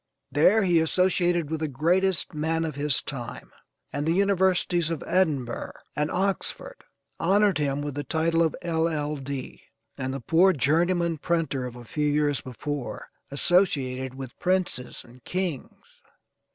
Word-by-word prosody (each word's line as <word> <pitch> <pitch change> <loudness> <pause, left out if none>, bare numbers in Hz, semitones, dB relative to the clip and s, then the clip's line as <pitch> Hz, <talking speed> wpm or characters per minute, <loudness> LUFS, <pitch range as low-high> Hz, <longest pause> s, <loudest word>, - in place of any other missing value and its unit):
There 190 +9 +4
he 175 -3 +4
associated 175 -1 +2
with 160 - -1
the 155 - -1
greatest 175 +8 +1
men 160 +2 0
of 155 - -3
his 145 -1 +1
time, 125 -5 -7 0.4
and 145 - -1
the 160 +2 +2
universities 185 -3 +2
of 165 -3 -3
Edinburgh 150 -10 0 0.2
and 150 +1 0
Oxford 195 - -2 0.4
honored 200 -2 +3
him 145 -1 0
with 145 -1 -4
the 145 +2 -3
title 165 +1 +1
of 160 -2 +2
L.L.D. 150 -5 -2 0.4
and 130 0 -2
the 135 - -4
poor 175 +9 +4
journeyman 165 +4 +1
printer 150 -6 -1
of 125 - -9
a 120 -1 -10
few 150 +5 -1
years 145 -2 +1
before, 140 +2 -5 0.2
associated 135 -5 +1
with 130 -2 -9
princes 180 -9 -1
and 120 +1 -18
kings. 180 -7 -5
160 Hz, 140 wpm, -26 LUFS, 140-175 Hz, 0.4 s, There